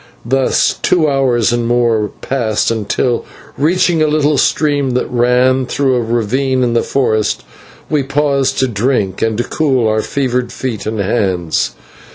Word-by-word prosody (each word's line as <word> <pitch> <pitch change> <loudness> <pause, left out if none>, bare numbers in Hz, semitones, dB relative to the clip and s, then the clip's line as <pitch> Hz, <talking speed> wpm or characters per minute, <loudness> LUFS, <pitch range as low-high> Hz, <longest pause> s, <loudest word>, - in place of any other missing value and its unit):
Thus 135 +2 +1
two 165 -4 +2
hours 130 -5 +1
and 120 -1 -1
more 115 -3 +1
passed, 115 -5 0 0.2
till, 125 -3 0 0.3
reaching 165 +2 +1
a 155 - +3
little 150 -1 +1
stream 145 -4 +1
that 125 - 0
ran 125 +1 +2
through 135 0 0
a 125 - +1
ravine 125 +3 0
in 120 -1 0
the 115 - +2
forest, 110 -6 0 0.4
we 150 -2 +1
paused 140 0 0
to 130 - +2
drink 105 -4 -1
and 110 -1 0
to 120 - 0
cool 130 -5 0
our 110 0 +1
fevered 125 -2 -2
feet 115 -6 -5
and 110 0 -3
hands. 95 -5 -1
125 Hz, 155 wpm, -15 LUFS, 115-135 Hz, 0.4 s, a